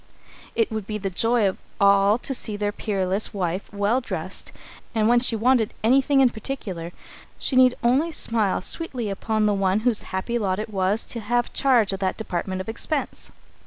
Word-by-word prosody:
It 225 -1 +1
would 215 -3 -4
be 215 - -3
the 195 -2 -4
joy 225 +3 +2
of 190 - -3 0.2
all 200 +1 +5
of 245 - -7
them - - -7
to 270 - +2
see 215 -4 -1
their 205 0 -1
peerless 200 -1 -2
wife 185 0 -3
well 205 +5 +1
dressed, 185 -5 -5 0.4
and 215 -1 +2
when 240 +1 +5
she 240 -1 +2
wanted 230 0 +2
anything 270 +4 +4
in 255 -2 +4
particular, 200 -8 -5 0.5
she 265 - 0
need 255 -1 +6
only 270 +8 +2
smile 220 - +1
sweetly 250 - -1
upon 215 +2 -1
the 210 - +3
one 195 +1 +1
whose 235 -2 +2
happy 220 +6 -2
lot 190 -3 0
it 215 +2 -4
was 195 +3 +1
to 235 - -5
have 240 +3 -1
charge 240 -7 +3
of 195 - -4
that 190 -1 -1
department 185 -2 -3
of 185 - -9
expense. 275 +6 -3
215 Hz, 195 wpm, -24 LUFS, 195-240 Hz, 0.5 s, need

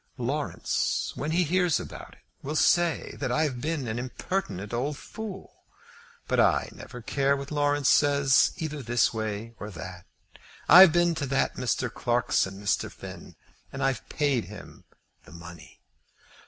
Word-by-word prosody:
"Laurence, - - -1
when 150 - -4
he 175 +3 +2
hears 175 -1 +2
about - - -9
it, - - -23 0.2
will 150 +3 -4
say 170 +1 +2
that 130 -3 -2
I've 140 -3 0
been 150 -3 -2
an 110 +2 -3
impertinent 120 - -4
old 135 +5 -2
fool; 205 -1 -9 0.7
but - - +1
I - - +3
never 125 -2 -11
care 140 +2 +1
what 140 +2 -7
Laurence 145 -2 +1
says, 140 -2 +4
either 155 -4 -4
this 120 -1 +1
way 110 +1 -4
or 105 - -6
that. 90 -1 -9 0.6
I've 180 +1 +10
been 175 +1 +3
to 145 -3 -3
that 135 +1 +1
Mr. 125 -1 -1
Clarkson, 120 -5 0
Mr. 105 0 -1
Finn, - - -11 0.4
and 135 0 -4
I've 135 -2 -1
paid 140 -7 0
him 105 +3 -12 0.4
the - - -15
money." 85 -3 -12
135 Hz, 150 wpm, -27 LUFS, 115-155 Hz, 0.7 s, I've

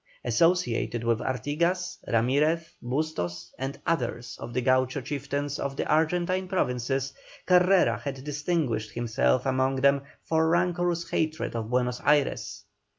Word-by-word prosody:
Associated 165 -9 +1
with 115 -1 +1
Artigas, 170 +8 -1
Ramirez, 150 +8 +1
Bustos, 120 - -3
and 135 +1 -4
others 120 -6 -2
of - - -7
the 125 +2 -1
Gaucho 130 +1 +2
chieftains 140 +1 -3
of 140 0 -3
the - - -2
Argentine 175 +4 +1
Provinces, 135 -5 -1 0.3
Carrera 180 +1 +4
had 135 -2 -5
distinguished 150 -7 -1
himself 120 +2 +1
among 130 0 +1
them 140 +1 +3 0.2
for 160 0 +2
rancorous 175 0 +1
hatred 155 -5 -1
of 110 -1 -3
Buenos 125 0 0
Ayres. 145 -1 +1
140 Hz, 125 wpm, -27 LUFS, 125-165 Hz, 0.3 s, Carrera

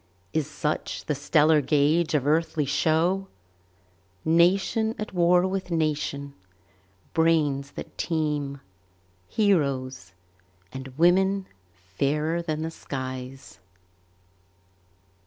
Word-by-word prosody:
Is 155 -1 -1
such 150 0 -3
the 150 - 0
stellar 150 +2 +3
gauge 155 +4 +2
of 140 -3 +1
earthly 160 0 +1
show, 160 +7 +1 1.0
Nation 190 +7 +3
at 215 - -6
war 180 0 +4
with 190 -1 -3
nation, 150 -3 -1 0.8
brains 150 -4 +1
that - - -9
teem, 150 -4 -2 0.7
Heroes, 135 - 0 0.6
and 130 0 -6
women 190 +3 +3 0.5
fairer 150 +4 +1
than 155 -2 -3
the 160 - -3
skies? 130 -5 -7
155 Hz, 90 wpm, -26 LUFS, 140-170 Hz, 1.0 s, war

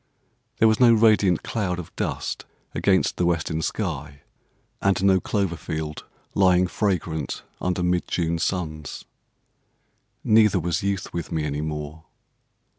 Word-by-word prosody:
There 110 - +5
was 110 0 +3
no 125 -2 +7
radiant 105 -5 +4
cloud 95 -6 -2
of 90 -3 -8
dust - - -3 0.3
against 95 -2 +2
the 90 - +1
western 85 -1 0
sky, 75 -7 -3 0.6
and 95 -1 +2
no 95 -1 +5
clover 95 -3 -1
field 80 -1 -5 0.3
lying 90 -1 +4
fragrant 90 -5 -2 0.2
under 90 0 0
mid 90 0 +1
June 85 -1 -1
suns, 80 -5 -3 1.2
Neither 110 -3 +5
was 85 -2 -1
youth 100 -1 -2
with 85 -1 -4
me 80 - -1
any 75 0 -2
more. 75 +1 -5
90 Hz, 130 wpm, -24 LUFS, 80-100 Hz, 1.2 s, no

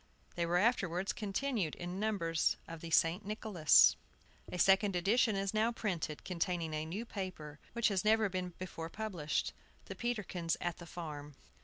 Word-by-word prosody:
They 170 -1 -1
were 175 +1 +2
afterwards 195 -4 +1
continued 210 - -1
in 175 +2 -5
numbers 190 -7 +1
of 165 -1 -8
the 165 - -6
"St. 165 +4 +3
Nicholas." 205 -6 +5 0.6
A - - -4
second 195 +1 +4
edition 210 +4 +3
is 195 +1 -1
now 220 +2 +2
printed, 175 -9 -3
containing 170 -2 -1
a 155 +1 -2
new 200 +8 -4
paper, 185 -9 -6
which 235 0 +2
has 195 -2 0
never 220 0 +4
before 180 -2 -5
been - - -19
published, 180 -9 -2 0.3
"The - - -6
Peterkins 200 -8 -2
at 175 -2 -2
the 170 - -9
Farm." 150 -4 -7
180 Hz, 160 wpm, -34 LUFS, 165-210 Hz, 0.6 s, Nicholas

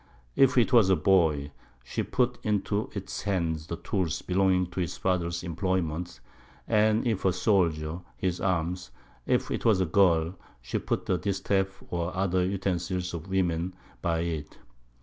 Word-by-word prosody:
If 135 -1 +4
it 120 +2 +4
was 110 -6 +6
a 95 - +5
Boy, 75 -5 +2 0.3
she - - -3
put 125 -1 0
into 105 0 0
its 100 -1 -5
Hand 85 -5 0
the 85 - -2
Tools 90 -2 -2
belonging 95 0 +2
to - - -5
its 85 -3 -2
Father's 85 -2 -1
Imployment; 85 -4 -2 0.5
and 110 +1 +3
if 110 -5 0
a 95 - +4
Soldier, 85 -5 +1 0.2
his 90 -2 -1
Arms. 90 -1 -1 0.4
If - - +1
'twas 110 -5 +2
a 95 - +2
Girl, 85 -2 +3 0.3
she 60 +1 -3
put - - -2
a 90 - +1
Distaff 95 -1 -1
or 85 +1 -2
other 95 -1 +2
Utensils 90 -1 -2
of 85 +1 -6
Women 90 -1 0 0.3
by 85 -1 0
it. 80 -3 -4
90 Hz, 150 wpm, -28 LUFS, 85-95 Hz, 0.5 s, was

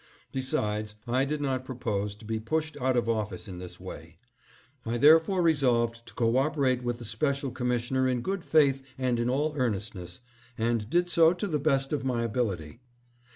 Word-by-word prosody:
Besides, 105 -5 -1
I 130 +3 +2
did 150 +1 -2
not 130 -2 -1
propose 105 -6 -3
to 105 - -15
be 110 0 -2
pushed 155 +7 -2
out 130 -2 +1
of 120 - +1
office 105 -3 -2
in 90 -2 -7
this 90 0 -9
way. 85 -3 -10 0.7
I 115 +1 -2
there 150 +6 +8
fore 180 +2 -1
resolved 120 -7 +2
to - - -13
co 115 0 +2
operate 135 -3 +1
with 120 -1 -2
the 120 - -8
special 135 +5 -1
commissioner 125 +1 0
in 125 -1 0
good 190 +6 -3
faith 140 -5 +3 0.2
and 125 -2 0
in 120 +1 0
all 150 +4 0
earnestness, 105 -7 -3 0.4
and 115 -1 0
did 175 +4 +2
so 165 -1 +5
to 180 +4 -3
the 155 -7 -1
best 135 +1 +1
of 145 - -1
my 125 -3 0
ability. 105 -7 -2
125 Hz, 185 wpm, -28 LUFS, 110-140 Hz, 0.7 s, there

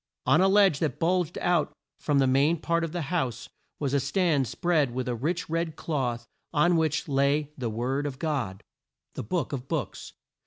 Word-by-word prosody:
On 155 - +4
a 190 - +5
ledge 195 -6 +4
that 150 -6 -1
bulged 175 0 +1
out 175 -4 +1 0.3
from 145 -2 +1
the 135 - +4
main 140 +6 +3
part 170 +1 0
of 165 - -3
the 175 -1 -3
house, 130 -8 -2 0.3
was 140 -2 -2
a 140 - +3
stand 145 -1 +1
spread 145 0 0
with 130 -1 -2
a 125 - 0
rich 160 +9 -2
red 165 -1 -2
cloth 125 -8 -2 0.3
on 170 +3 +3
which 160 -2 0
lay 140 +1 +1
the 125 -4 -3
Word 130 +6 -1
of 135 -2 -6
God, 130 - -3 0.5
the - - -5
Book 165 - -2
of 135 -1 -5
Books. 135 - -4
150 Hz, 190 wpm, -27 LUFS, 130-165 Hz, 0.5 s, a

